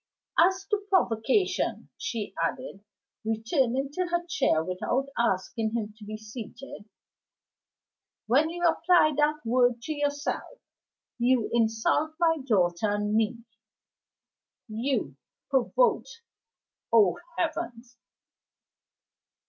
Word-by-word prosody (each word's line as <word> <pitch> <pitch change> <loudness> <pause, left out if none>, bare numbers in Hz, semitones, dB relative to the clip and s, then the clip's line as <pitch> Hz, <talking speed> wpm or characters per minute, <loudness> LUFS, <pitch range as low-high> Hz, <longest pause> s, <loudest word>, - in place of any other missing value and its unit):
"As 375 +3 +4
to 415 - +4
provocation," 315 - +1
she 210 -5 -4
added, 200 +2 -4 0.4
returning 245 +4 0
to 365 +4 -2
her 345 0 -1
chair 265 - +1
without 190 +10 -2
asking 220 +1 0
him 215 -2 -3
to - - -11
be 215 +1 -6
seated, 220 0 -10 1.4
"when 280 +8 +3
you 350 +1 -2
apply 330 -1 +4
that 300 -1 +1
word 245 0 +3
to 310 - -3
yourself, 290 +10 -3 0.6
you 245 -1 +2
insult 230 +7 +1
my 325 -2 +3
daughter 190 -5 +1
and 205 0 -1
me. 225 +2 0 1.2
You 225 - -2 0.3
provoked? 460 - +1 0.7
Oh, 205 -7 +4 0.2
heavens!" 240 0 -3
245 Hz, 100 wpm, -27 LUFS, 220-305 Hz, 1.4 s, As